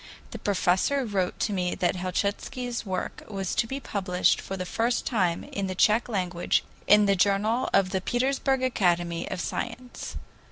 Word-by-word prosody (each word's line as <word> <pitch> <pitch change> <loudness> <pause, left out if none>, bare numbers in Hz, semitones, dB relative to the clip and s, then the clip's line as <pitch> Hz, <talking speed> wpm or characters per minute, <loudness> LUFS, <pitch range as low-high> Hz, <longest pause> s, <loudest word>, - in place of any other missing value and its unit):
The - - -7
professor 205 +7 +1
wrote 195 -5 -1
to 210 - 0
me 180 -2 -1
that 180 -1 +1
Helchitsky's 205 +6 -2
work 185 -1 -3
was 195 -3 -3
to 225 +1 +1
be 270 +4 -4
published 190 -7 +1
for 195 - -5
the 185 - -3
first 230 +5 0
time 180 -8 +1
in 200 -1 -4
the 185 - -4
Tsech 220 +6 +3
language 180 -5 0 0.2
in 210 0 +7
the 200 0 +3
JOURNAL 205 +6 +2
OF 195 -2 +3
THE 190 - 0
PETERSBURG 265 +4 +1
ACADEMY 175 -8 +1
OF 190 - -4
SILENCE. 245 +6 -5
200 Hz, 165 wpm, -27 LUFS, 185-235 Hz, 0.2 s, in